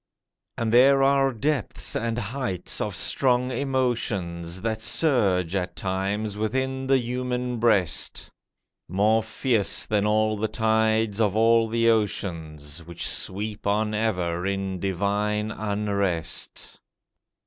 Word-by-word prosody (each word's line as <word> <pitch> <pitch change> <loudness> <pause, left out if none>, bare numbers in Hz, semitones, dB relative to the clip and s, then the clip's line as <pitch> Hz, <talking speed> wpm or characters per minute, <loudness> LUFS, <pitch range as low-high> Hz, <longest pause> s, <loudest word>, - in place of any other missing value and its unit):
And 115 -1 -1
there 135 +3 +6
are 135 0 +3
depths 135 0 -2
and 115 +1 -1
heights 120 -5 -2
of 105 -3 -2
strong 125 +3 +2
emotions 110 -10 -2
That 110 -1 -2
surge 100 - +2
at 90 -2 -2
times 100 +2 -2
within 130 +4 -2
the 135 0 +4
human 125 0 -3
breast, 105 -8 +1 0.6
More 105 +5 +3
fierce 110 -1 0
than 105 -1 +1
all 110 0 +2
the 110 +2 -1
tides 110 -1 +1
of 105 -2 +1
all 115 +1 +4
the 115 +1 +1
oceans 80 -8 -3
Which 85 0 -4
sweep 105 +2 -2
on 105 +1 +1
ever 90 -6 -1
in 95 -1 -2
divine 105 +3 -1
unrest. 100 -5 -2
110 Hz, 115 wpm, -25 LUFS, 95-120 Hz, 0.6 s, there